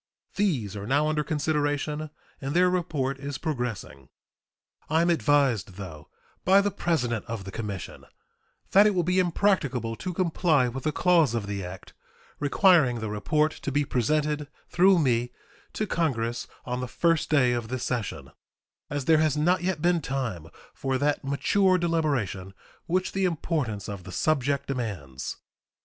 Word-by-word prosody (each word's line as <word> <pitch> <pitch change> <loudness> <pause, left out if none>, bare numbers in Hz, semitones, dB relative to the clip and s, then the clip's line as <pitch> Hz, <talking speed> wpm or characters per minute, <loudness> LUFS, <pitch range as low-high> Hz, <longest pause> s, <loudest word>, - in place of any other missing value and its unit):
These 135 - 0
are 100 0 -6
now 145 +4 +2
under 150 -1 0
consideration, 150 0 -1 0.3
and 140 +3 -3
their 180 +1 +4
report 140 -7 -1
is 140 0 -5
progressing. 120 - -4 0.8
I 160 +2 +3
am 175 - +3
advised, 140 - +2
though, 85 -6 -9 0.3
by 190 +2 +6
the 200 0 +1
president 125 - -1
of 115 -3 -5
the 95 - -8
commission 100 -4 -6 0.7
that 200 +2 +7
it 205 - +1
will 175 - +2
be 180 +2 +2
impracticable 160 - +1
to 185 - -4
comply 165 -6 +2
with 135 +4 -7
the 155 - +2
clause 165 -6 +3
of 115 -3 -2
the 100 -1 -4
act 90 +1 -9 0.5
requiring 145 - +4
the 110 -1 -4
report 150 +9 +1
to 140 - -3
be 145 +1 +1
presented, 150 +4 0 0.2
through 185 +2 +5
me, 125 -6 +1 0.4
to 215 - -1
Congress 120 - -1 0.2
on 125 0 -3
the 125 - -3
first 165 +4 +1
day 130 -5 +4
of 120 -2 -2
this 125 +1 -4
session, 120 -5 -3 0.6
as 145 -2 -3
there 160 +1 +5
has 155 -2 +2
not 175 +4 +2
yet 175 -4 -2
been 175 -1 +3
time 125 - -3 0.3
for 135 -1 -1
that 145 +2 0
mature 185 +8 +2
deliberation 140 - -1 0.3
which 185 +2 0
the 195 0 0
importance 145 - -2
of 100 -3 -6
the 90 - -9
subject 140 +2 0
demands. 95 - -4
145 Hz, 160 wpm, -26 LUFS, 120-165 Hz, 0.8 s, that